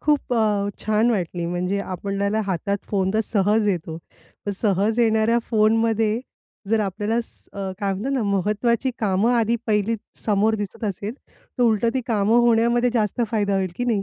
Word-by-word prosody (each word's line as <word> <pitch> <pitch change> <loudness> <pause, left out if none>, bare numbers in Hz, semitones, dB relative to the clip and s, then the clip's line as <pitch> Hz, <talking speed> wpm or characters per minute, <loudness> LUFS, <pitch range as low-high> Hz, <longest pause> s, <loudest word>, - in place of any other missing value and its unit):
खूप 295 -4 +1
अ, 210 -3 +1 0.2
छान 215 +3 +2
वाटली. 175 -4 -2
म्हणजे 180 +3 -1
आपल्याला 200 +3 -2
हातात 200 +2 -1
फोन 190 -2 +1
तर 220 - +3
सहज 210 +1 +2
येतो. 165 -4 -2 0.5
पण 205 - 0
सहज 210 +2 +1
येणाऱ्या 225 0 +3
फोनमध्ये 225 0 +2 0.5
जर 225 - +3
आपल्याला 210 +3 -1
स - - -10 0.3
काय 200 -1 0
म्हणतात 215 +9 -3
ना, 265 -3 0
महत्वाची 210 +5 +1
कामं 210 +2 +2
आधी 230 0 +2
पहिली 210 +1 +1 0.3
समोर 215 +1 +3
दिसत 210 +1 -5
असेल. 205 +2 -3 0.4
तर - - +3
उलटं 230 -1 +3
ती 260 - +1
कामं 220 0 +3
होण्यामध्ये 235 +1 +3
जास्त 220 0 0
फायदा 205 -3 +1
होईल 190 -2 0
की 245 - -2
नाही? 220 -5 +1
215 Hz, 165 wpm, -23 LUFS, 200-230 Hz, 0.5 s, तर